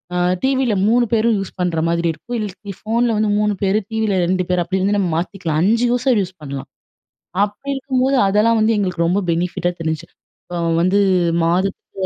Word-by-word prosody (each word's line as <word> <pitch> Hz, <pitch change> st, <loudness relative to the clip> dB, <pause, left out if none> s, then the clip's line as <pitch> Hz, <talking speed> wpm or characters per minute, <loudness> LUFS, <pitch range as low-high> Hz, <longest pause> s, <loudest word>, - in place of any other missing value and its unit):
அ -, -, 0 dB, 0.3 s
டிவில 265 Hz, -3 st, +1 dB
3 240 Hz, +2 st, +3 dB
பேரும் 225 Hz, 0 st, +3 dB
யூஸ் 195 Hz, -, -5 dB
பண்ணுற 175 Hz, -2 st, 0 dB
மாதிரி 170 Hz, 0 st, 0 dB
இருக்கும். 240 Hz, +10 st, -6 dB
இல்ல 200 Hz, -1 st, -6 dB
ஃபோன்ல 230 Hz, +1 st, +1 dB
வந்து 215 Hz, 0 st, +1 dB
3 210 Hz, -1 st, +1 dB
பேரு 195 Hz, +2 st, +2 dB
டிவில 220 Hz, -3 st, 0 dB
2 185 Hz, 0 st, 0 dB
பேரு 180 Hz, -1 st, +1 dB
அப்டி 190 Hz, +2 st, -2 dB
வந்து 205 Hz, +1 st, +1 dB
நம்ம 185 Hz, -4 st, 0 dB
மாத்திக்கலாம். 170 Hz, -3 st, -2 dB
5 230 Hz, +5 st, +3 dB
யூசர் 245 Hz, -2 st, +2 dB
யூஸ் 185 Hz, 0 st, -6 dB
பண்லாம். 140 Hz, -1 st, -6 dB, 0.8 s
அப்படி 210 Hz, +7 st, -7 dB
இருக்கும்போது 265 Hz, 0 st, 0 dB
அதெல்லாம் 220 Hz, +3 st, +3 dB
வந்து 220 Hz, +1 st, +3 dB
எங்களுக்கு 180 Hz, -4 st, 0 dB
ரொம்ப 190 Hz, +4 st, +1 dB
பெனிஃபிட்டா 175 Hz, +1 st, -1 dB
தெரிஞ்ச்சு. 160 Hz, +1 st, -3 dB, 0.4 s
இப்ப 175 Hz, -1 st, -4 dB, 0.2 s
வந்து 185 Hz, +3 st, +3 dB, 0.5 s
மாதத்துல 185 Hz, +3 st, -1 dB
200 Hz, 175 wpm, -19 LUFS, 180-225 Hz, 0.8 s, 3